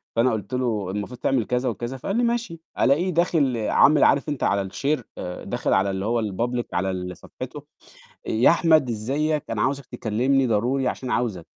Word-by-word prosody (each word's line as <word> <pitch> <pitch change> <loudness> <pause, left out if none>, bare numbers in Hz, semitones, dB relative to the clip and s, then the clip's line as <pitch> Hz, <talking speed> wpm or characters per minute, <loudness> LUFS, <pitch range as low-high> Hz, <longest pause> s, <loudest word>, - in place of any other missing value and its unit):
فأنا 120 +2 +3
قُلت 110 +2 -4
له: 110 -7 -1
"المفروض 105 +5 -5
تعمل،" 125 -4 +1
كذا 125 +1 0
وكذا. 120 +4 -5
فقال 195 +10 -3
لي: 245 - +2
"ماشي." 235 -8 -1 0.2
ألاقيه 155 +8 +3
داخل 160 -7 +2
عامل 140 +6 +4
عارف 140 +2 +3
أنت 145 -3 -3
على 100 0 +2
الشير 125 +7 -2
آآ 90 0 -6
داخل - - -1
على 95 +1 +2
اللي 95 +1 -3
هو 115 +1 +1
الpublic 120 +4 -2
على 95 +2 0
ال 90 -1 -5
صفحته، - - -9 0.6
يا 110 +3 +4
أحمد 160 -5 +4
إزيك؟ 140 +7 -1
أنا - - -1
عاوزك 140 0 -1
تكلِّمني 125 +3 0
ضروري 125 +5 +1
عشان 125 0 -3
عاوزك. 100 -9 -2
125 Hz, 180 wpm, -24 LUFS, 105-140 Hz, 0.6 s, عامل